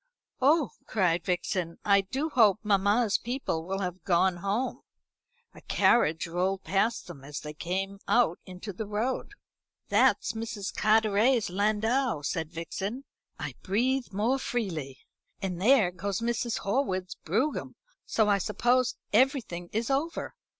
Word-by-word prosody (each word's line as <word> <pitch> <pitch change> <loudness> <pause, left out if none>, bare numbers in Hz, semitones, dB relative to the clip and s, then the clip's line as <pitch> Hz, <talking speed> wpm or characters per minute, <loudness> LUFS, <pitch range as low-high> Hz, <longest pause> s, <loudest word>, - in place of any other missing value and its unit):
"Oh," 290 +1 +4 0.2
cried 180 -5 +1
Vixen, 175 -1 -2
"I 200 -1 +5
do 265 +11 -3
hope 220 -9 +5
mamma's 205 +2 +2
people 235 -10 -3
will 195 +1 -2
have 180 -1 -4
gone 180 0 +2
home." 200 +8 -2 0.7
A - - -14
carriage 165 -9 +3
rolled 185 +3 -1
past 200 +5 0
them 155 -7 -11
as 145 +1 -6
they 150 0 -7
came 195 +5 -3
out 235 -8 +3
into 185 +3 -8
the 210 +4 -5
road. 235 - -2 0.6
"That's - - +3
Mrs. 225 -3 -5
Carteret's 220 +1 +3
landau," 215 - +1
said 160 +1 -2
Vixen. 195 +9 -4 0.3
"I - - -5
breathe 245 +6 0
more 225 +7 +1
freely. 165 - -3 0.4
And 185 -3 -4
there 220 -4 +5
goes 190 +2 -3
Mrs. 235 0 -1
Horwood's 190 -5 -1
brougham; 225 - -2 0.3
so 220 -2 +1
I 200 -1 +3
suppose 240 +6 +1 0.2
everything 220 -8 +1
is 225 +4 -1
over. 305 +5 -1
205 Hz, 135 wpm, -28 LUFS, 180-235 Hz, 0.7 s, I